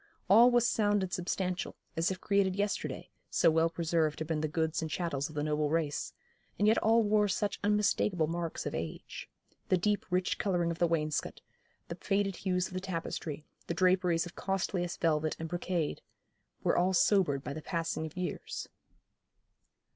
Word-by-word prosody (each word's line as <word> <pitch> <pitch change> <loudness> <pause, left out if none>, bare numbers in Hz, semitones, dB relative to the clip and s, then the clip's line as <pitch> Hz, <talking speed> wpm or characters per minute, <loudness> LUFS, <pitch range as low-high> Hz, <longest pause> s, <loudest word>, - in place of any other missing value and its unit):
All 230 +4 +8
was 240 -1 +3
sound 205 -3 +2
and 185 - -4
substantial, 180 0 -2 0.2
as 165 +1 +1
if 190 -1 -4
created 200 -2 +1
yesterday, 205 0 -2 0.2
so - - +4
well 165 +1 +3
preserved 165 -2 0
had 160 - -4
been 155 -2 0
the 155 - 0
goods 160 +1 -1
and 160 - -3
chattels 155 -3 -2
of 155 - -12
the 145 - -1
noble 150 0 0
race; 155 -2 -1 0.5
and 205 - +3
yet 220 - +5
all 225 +1 +4
wore 210 0 +3
such 205 +1 -1
unmistakeable 205 -4 +2
marks 165 +1 -3
of - - -3
age. - - -6 0.4
The 185 - +4
deep 205 +3 0
rich 180 0 0
colouring 175 -4 +1
of 165 - -6
the 175 - +4
wainscot, 155 -3 -1 0.5
the - - -4
faded 195 -1 0
hues 180 -2 0
of - - -13
the 185 - -2
tapestry, 165 -4 -4 0.2
the 170 - -2
draperies 180 -1 +3
of 175 - -9
costliest 185 -2 -2
velvet 155 -2 +1
and 165 - -5
brocade, 175 -2 -2 0.6
were - - +2
all 185 +2 +2
sobered 175 -7 +3
by 140 - -4
the 155 - -6
passing 165 -2 -2
of 155 - -14
years. 180 -1 -4
175 Hz, 175 wpm, -31 LUFS, 160-195 Hz, 0.6 s, All